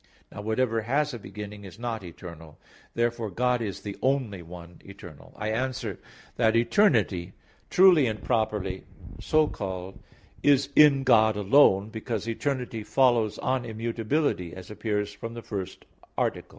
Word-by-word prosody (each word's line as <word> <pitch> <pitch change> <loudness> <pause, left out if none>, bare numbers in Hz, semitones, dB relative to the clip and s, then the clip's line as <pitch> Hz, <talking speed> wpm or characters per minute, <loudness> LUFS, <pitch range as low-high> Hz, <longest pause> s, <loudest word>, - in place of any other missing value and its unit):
Now 105 - -7
whatever 110 +1 0
has 140 +6 0
a 120 - -6
beginning, 105 0 -9
is 95 -4 -11
not 115 -3 -4
eternal. 85 -3 -11 0.4
Therefore 115 -1 -1
God 125 +5 0
is 100 -4 -4
the 100 -1 -6
only 130 -8 0
one 85 0 -12
eternal. 90 -6 -13
I 105 - -3
answer 120 -4 -3 0.4
that, 115 -1 +3
Eternity 115 - +2 0.4
truly 180 -7 +6
and 110 -2 -4
properly 105 -5 -1 0.4
so 155 0 +3
called 95 -6 -6 0.4
is 140 -1 +3
in 145 -3 +6
God 110 -4 +4
alone, 105 -1 +4
because 110 -1 -4
eternity 125 -1 -2
follows 115 0 +2
on 130 -1 -1
immutability; 115 - -2
as 95 +2 -10
appears 105 -1 -2
from 115 +3 -8
the 115 - -8
first 95 -4 -6 0.3
article. - - -1
110 Hz, 140 wpm, -27 LUFS, 100-125 Hz, 0.4 s, truly